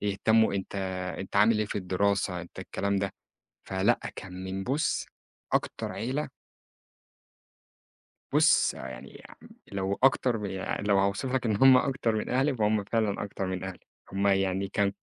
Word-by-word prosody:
يهتمّوا، 105 +2 +2
أنت 100 0 -4 0.4
أنت 95 +1 -5
عامل 105 +2 +5
إيه 110 - 0
في 105 - -3
الدراسة؟ 95 0 0
أنت 85 - -12
الكلام 100 0 -2
ده. 100 0 -1 0.5
فلأ، - - +1 0.2
كان 95 0 -8
من 95 +1 -4
بُص 155 +9 0 0.5
أكتر - - -1
عيلة 130 +9 -3 2.0
بُص، - - +4
يعني 65 -2 -9
آمم - - -16 0.2
لو 100 0 -1
أكترمن 120 -6 +3
يع 95 0 -3
لو 100 -1 +3
هاوصف 100 +7 0
لك 130 -2 0
إن 110 -3 +2
هم 130 +2 +8
أكتر 125 -4 0
من 105 - -2
أهلي، 130 +2 +2
فهم 105 -2 +1
فعلًا 105 -1 0
أكتر 100 -1 -4
من 95 0 -3
أهلي. 95 -1 -6 0.3
هم 100 +1 +1
يعني 95 0 +1
كان 100 0 0
100 Hz, 150 wpm, -28 LUFS, 95-115 Hz, 2.0 s, هم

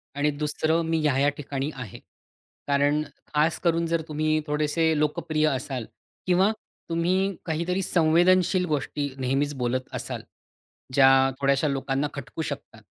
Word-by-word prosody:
आणि 145 +1 +1
दुसरं 155 +2 +1
मी 165 0 0
ह्या-ह्या 145 -1 +3
ठिकाणी 140 0 -3
आहे. 125 -7 -8 0.7
कारण 145 +1 +2 0.3
खास 155 +2 +2
करून 170 -1 +1
जर 165 0 0
तुम्ही 155 0 0
थोडेसे 155 +2 +1
लोकप्रिय 155 +1 +1
असाल 130 -3 -3 0.4
किंवा 185 +3 +4 0.4
तुम्ही 185 +4 +1
काहीतरी 170 +3 -1
संवेदनशील 180 +2 +3
गोष्टी 145 -2 -2
नेहमीच 135 +3 0
बोलत 125 0 -1
असाल, - - -4 0.7
ज्या 135 0 +6
थोड्याश्या 140 +2 +2
लोकांना 135 +1 -1
खटकू 140 +3 -6
शकतात. 140 -7 -7
150 Hz, 125 wpm, -25 LUFS, 140-165 Hz, 0.7 s, ज्या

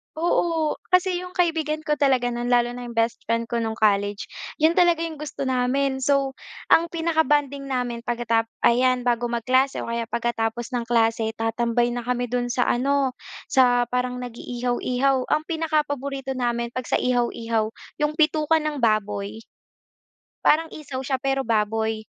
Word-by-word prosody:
Oo, 325 -1 +1 0.2
kasi 365 0 +2
yung 360 - -8
kaibigan 320 -4 0
ko 300 - +2
talaga 265 -4 +2
no'n 240 0 -2
lalo 240 0 +2
na 245 - -7
yung 240 - -7
bestfriend 230 0 -1
ko 235 -1 -1
nung 220 0 -4
college, 205 -1 +1 0.3
yun 320 +2 +4
talaga 345 -2 +4
yung 320 - -7
gusto 285 -2 -5
namin. 265 +1 0
So 275 -1 +1 0.3
ang 335 0 +4
pinaka 325 -1 +1
bonding 285 -2 +1
namin 245 -2 -2
pagkatap 230 -1 0 0.2
ayan, 250 +1 +3
bago 240 0 +1
magklase 255 +3 +1
o - - -5
kaya 235 0 -2
pagkatapos 235 0 -1
ng 240 - -1
klase 225 -1 +1
tatambay 235 +2 0
na 240 - -3
kami 245 0 -1
do'n 245 0 -1
sa 245 - +1
ano, 270 +1 +1 0.3
sa 245 -3 +4
parang 250 0 -2
nag-iihaw-ihaw 250 +2 -1
ang 305 +1 +1
pinaka 320 -2 0
paborito 275 -1 -4
namin 240 -1 -2
pag 255 - -2
sa - - 0
ihaw-ihaw 230 -3 0 0.3
yung 295 - +2
bituka 310 +1 +3
ng 300 -4 -3
baboy. 210 -1 0 1.1
Parang 325 +2 +4
isaw 285 -4 -7
siya 265 -1 -1
pero 270 -1 0
baboy, 220 0 0
250 Hz, 155 wpm, -24 LUFS, 235-285 Hz, 1.1 s, yun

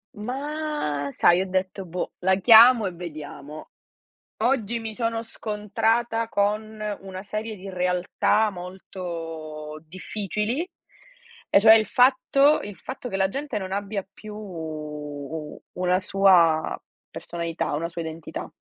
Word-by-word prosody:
Ma 270 - -3
sai 175 +1 +4
ho - - -1
detto: 185 +1 -2
"Boh, 180 +1 -4
la 190 +1 +3
chiamo 230 +2 +8
e - - -3
vediamo." 155 -3 -8 0.7
Oggi 235 -3 +1
mi 220 -1 -6
sono 230 -1 -1
scontrata 225 +1 -1
con 215 +1 -1 0.2
una 190 -1 -8
serie 215 +2 -4
di 195 +1 -8
realtà 180 +4 +1
molto 165 -5 -7
difficili 210 - -3 0.8
e - - +6
cioè 220 +2 +9
il 220 -1 +3
fatto 265 +5 +4
il 205 -3 -8
fatto 255 +7 -7
che 195 - -2
la 190 0 +3
gente 275 +3 -4
non 190 -2 -4
abbia 200 0 -3
più 215 -1 -10
u 150 -5 -7
una 180 0 +1
sua 185 -5 +4 0.3
personalità, 170 -1 -4
una 165 +3 -2
sua 170 0 -5
identità. 160 0 -6
195 Hz, 125 wpm, -25 LUFS, 170-220 Hz, 0.8 s, cioè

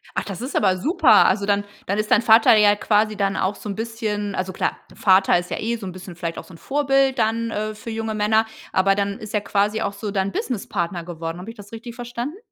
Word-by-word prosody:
Ach, - - 0
das 195 -1 -7
ist 260 +3 -5
aber 190 -3 +3
super. 315 - +5
Also, 200 +1 +2
dann 205 0 +1 0.2
dann 200 - -1
ist 215 0 -2
dein 225 - +5
Vater 225 0 +6
ja 210 -1 +5
quasi 215 +1 +1
dann 195 -1 0
auch 190 +2 0
so 210 - -8
'n 200 - -3
bisschen 215 -3 -3
also, 185 0 -3
klar, - - -1 0.2
Vater 190 -2 +4
ist 175 0 -5
ja - - -2
eh 230 +2 -1
so 220 -4 -8
'n 185 - -5
bisschen 180 -1 -10
vielleicht 170 -1 -4
auch - - -6
so 185 - -15
'n - - -12
Vorbild 270 - +1
dann, 230 +1 0
äh, 215 +1 -3
für 215 +2 -9
junge 220 -1 -3
Männer, 220 +1 +2 0.3
aber 195 +1 +3
dann 200 0 -2
ist 215 - -9
er 210 - +1
quasi 210 +2 0
auch 200 - -2
so 200 +1 -5
dein 195 -1 -1
Business-Partner 185 -8 -3
geworden. 165 0 -6
Habe 190 +5 -8
ich 230 - -10
das 205 +1 -12
richtig 230 +1 -8
verstanden? 245 +7 -5
210 Hz, 250 wpm, -22 LUFS, 195-225 Hz, 0.3 s, Vater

